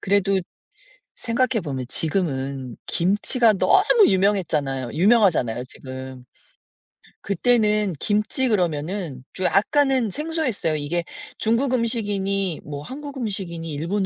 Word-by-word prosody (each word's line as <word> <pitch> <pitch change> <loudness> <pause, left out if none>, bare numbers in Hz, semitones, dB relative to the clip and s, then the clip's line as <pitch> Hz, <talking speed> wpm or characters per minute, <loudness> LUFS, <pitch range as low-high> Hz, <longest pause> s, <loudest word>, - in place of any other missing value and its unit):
그래도 195 0 +2 0.8
생각해 235 -2 0
보면 130 -4 -4
지금은 135 -7 -2
김치가 210 +6 +2
너무 395 - +4
유명했잖아요 160 -10 +1
유명하잖아요 170 - +3
지금. 130 -1 -9 1.0
그때는 210 -1 +2
김치 215 +5 +1
그러면은 170 - -1
좀 185 - -3
약간은 265 - +2
생소했어요. 300 - -2
이게 160 +4 -2 0.3
중국 235 +4 +1
음식이니 200 -7 -1
뭐 145 -1 -6
한국 285 - -8
음식이니 185 -8 -4
일본 175 +7 -1
195 Hz, 280 characters per minute, -23 LUFS, 155-230 Hz, 1.0 s, 너무